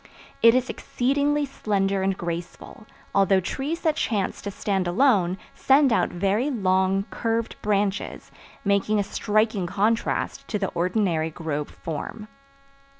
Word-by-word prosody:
It 230 +1 +7
is 255 0 +1
exceedingly 285 +5 0
slender 200 -7 -1
and 190 0 0
graceful, 175 +5 -6 0.3
although 195 -1 +4
trees 285 - -3
that 315 -2 +1
chance 205 -5 -1
to 205 - -4
stand 195 -2 -1
alone 185 -3 +3 0.2
send 270 -2 +4
out - - +2
very 200 +9 0
long, 190 -4 +1
curved 230 0 -1
branches, 205 -1 -1 0.3
making 200 +2 +2
a 205 - +2
striking 210 -2 0
contrast 225 +7 -1
to 210 - -1
the 195 -2 -1
ordinary 175 -2 0
grove 150 -2 -4
form. 170 +7 -6
200 Hz, 130 wpm, -24 LUFS, 190-230 Hz, 0.3 s, It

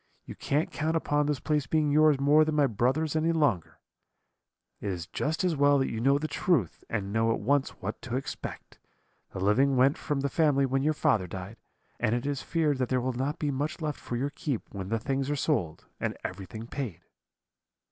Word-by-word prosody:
You - - -7
can't 150 +3 -1
count 160 +1 -1
upon 145 -2 +1
this 145 -3 0
place 150 -3 0
being 155 -2 +2
yours 150 -1 +5
more 145 +3 +5
than 155 0 -1
my 145 -1 +4
brother's 135 +7 0
any 160 +1 +2
longer; 145 - 0 1.0
it - - -5
is 90 -3 -3
just 160 - -2
as 180 -3 +2
well 145 0 +4
that 135 - 0
you 110 - -3
know 135 +3 +4
the 155 +2 -2
truth, 140 - 0
and 100 -3 -3
know 115 0 +2
at - - 0
once 140 +5 +2
what - - -4
to 120 - -4
expect. 135 - -6 0.5
The - - -7
living 130 +8 +3
went 135 +4 +4
from 145 -3 -2
the 140 - +1
family 140 -2 +3
when 135 +1 0
your 155 +2 +1
father 105 -10 +2
died, 95 +5 -7 0.4
and 110 - +1
it 120 - -3
is 140 -1 -2
feared 155 -5 0
that 125 - 0
there 130 - +2
will 130 +1 -1
not 135 +6 -2
be 150 -3 -1
much 145 +6 -2
left 150 -3 -3
for 120 - -5
your 140 +4 -1
keep 140 -4 -3
when 95 -2 -5
the 115 - +1
things 135 +4 -2
are 145 - +1
sold, 115 - -1
and - - -2
everything 100 +4 -6
paid.' 120 - -5
140 Hz, 210 wpm, -28 LUFS, 115-150 Hz, 1.0 s, yours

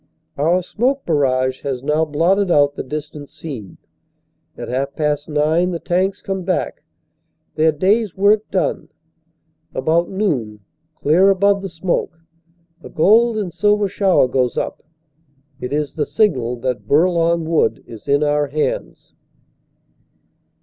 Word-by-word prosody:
Our 165 +5 +1
smoke 260 +9 -1
barrage 130 -4 +1
has 135 -3 -4
now 150 +3 +1
blotted 180 +6 +1
out 145 -3 +4
the - - -5
distant 150 +1 -7
scene. 125 - -9 0.8
At - - -6
half 135 +3 -3
past 150 -1 -1
nine 155 +4 +1
the 170 -2 -3
tanks 185 +4 -1
come 195 -1 -3
back, 180 0 -2 0.7
their 160 +1 +3
day 190 +9 +2
s 205 -6 -9
work 205 +2 +3
done. 190 - -1 0.9
About 160 +6 +1
noon, 130 - -2 0.3
clear 175 +7 +3
above 200 +1 +3
the 195 - -5
smoke, 170 -1 -2 0.6
a - - -10
gold 225 +7 +3
and 190 -6 -3
silver 210 0 +2
shower 190 -7 +2
goes 125 -1 0
up. - - -3 0.8
It 125 - -5
is 145 -1 -2
the 150 -3 -2
signal 130 - +1
that 130 -2 -3
Bourlon 170 +1 +2
Wood 165 0 +1
is 115 -2 -12
in 140 +1 +2
our 150 0 +1
hands. 150 +2 -3
160 Hz, 135 wpm, -19 LUFS, 145-190 Hz, 0.9 s, out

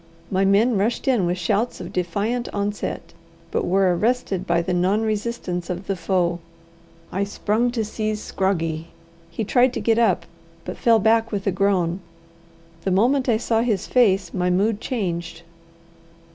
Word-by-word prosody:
My 195 0 +2
men 205 +3 +3
rushed 225 +7 -1
in 235 -9 +3
with 175 +1 -1
shouts 205 +7 0
of - - -8
defiant 205 +7 -1
onset, 205 0 -3 0.4
but - - -1
were 185 -1 +3
arrested 200 -3 0
by 170 0 +2
the 180 - -2
non 190 +5 +2
resistance 210 -5 -3
of 180 +2 -4
the 195 - -1
foe. 175 -1 0 0.7
I 195 - 0
sprung 210 +4 0
to 225 -3 -1
seize 215 0 -2
Scroggie. 165 -6 -1 0.4
He 170 +6 -3
tried 245 +4 +3
to - - -2
get 230 0 +2
up, 220 -6 +2 0.4
but 180 - -5
fell 230 -1 +4
back 225 +2 +2
with 200 -2 -3
a 195 - +2
groan. 185 -2 +1 0.8
The 195 - 0
moment 250 +8 +2
I 225 - +4
saw 225 0 +1
his 220 -6 0
face, 195 -8 +2
my 180 -1 0
mood 200 +4 +1
changed. 175 -7 -3
200 Hz, 160 wpm, -22 LUFS, 180-225 Hz, 0.8 s, fell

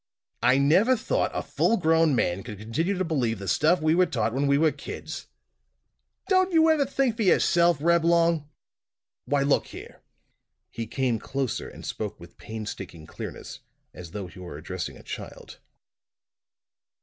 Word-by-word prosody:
"I 130 - +4
never 185 - +4
thought - - 0
a - - -3
full 230 - +1
grown 160 -3 +3
man 90 -5 0
could 105 -2 -8
continue 155 - -2
to 185 - 0
believe 125 -9 0
the 100 0 -8
stuff 165 - +3
we 155 0 +3
were 180 +1 +4
taught 115 -6 -1
when 140 +2 0
we 140 0 +4
were 155 +1 +3
kids! - - -8 1.0
Don't 370 -1 +3
you 325 -1 +5
ever 290 -4 +2
think 265 -4 0
for - - -2
yourself, 175 -4 +4
Reblong? 170 -1 +2 0.8
Why, 140 -1 +1
look 140 0 +2
here!" - - -11 0.7
He 115 -1 -5
came 125 -1 -1
closer 135 +1 -3
and - - -11
spoke 105 -2 -5
with 85 0 -15
painstaking 100 -7 -7
clearness, - - -8 0.3
as 90 -2 -10
though 100 +2 -6
he 90 +1 -12
were 85 -5 -8
addressing 90 +4 -6
a - - -15
child. - - -9
145 Hz, 160 wpm, -26 LUFS, 110-170 Hz, 1.0 s, you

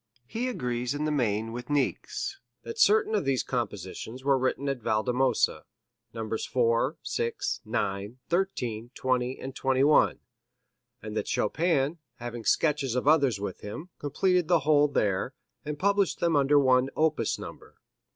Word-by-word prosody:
He 235 - -3
agrees 125 - -2
in 150 +1 -2
the 155 - 0
main 115 -5 0
with 120 +2 -7
Niecks, 145 - -1 0.2
that 460 0 -7
certain 435 0 +4
of - - +1
these 135 -2 +1
compositions 115 +1 -4
were 140 0 +4
written 130 +2 -1
at 135 -3 -2
Valdemosa 125 +4 +1 0.5
Nos. 110 -1 -4
4, 125 +5 +1
6, 115 0 -2
9, 100 +4 -2
13, 125 - -1
20 130 0 -1
and 135 0 -7
21 135 +3 +3 0.8
and 110 0 -6
that - - -2
"Chopin, 160 - +1 0.2
having 120 -1 -6
sketches 140 -2 +1
of 125 +2 -1
others 140 -9 +4
with 100 -2 -5
him, 155 - -7
completed 180 +4 +1
the 170 -2 +4
whole 150 0 +4
there, 105 -1 0 0.3
and 150 -1 -4
published 200 +2 +1
them 170 -2 +2
under 145 +1 +4
one 130 -1 +4
opus 155 -8 +1
number. - - -10
130 Hz, 145 wpm, -28 LUFS, 115-155 Hz, 0.8 s, certain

